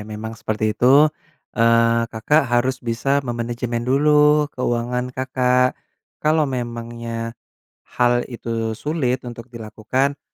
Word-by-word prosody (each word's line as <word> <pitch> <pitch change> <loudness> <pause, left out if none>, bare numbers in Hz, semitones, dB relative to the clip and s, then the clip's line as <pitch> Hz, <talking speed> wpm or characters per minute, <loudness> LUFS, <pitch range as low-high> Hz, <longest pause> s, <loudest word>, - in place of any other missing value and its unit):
memang 110 +1 -6
seperti 110 0 -2
itu, 120 - +1 0.7
eee, 115 0 +4
Kakak 145 +8 +2
harus 130 +2 +2
bisa 115 +4 -2 0.2
memanajemen 120 0 -3
dulu 150 +1 +4
keuangan 125 0 -1
Kakak, 125 -1 +1 0.5
kalau 155 0 +3
memangnya, 115 -1 -5 0.6
hal 120 0 +3
itu 115 -2 -4
sulit 130 -1 -2
untuk 120 -1 -9
dilakukan, 115 +5 -2
120 Hz, 105 wpm, -21 LUFS, 115-130 Hz, 0.7 s, eee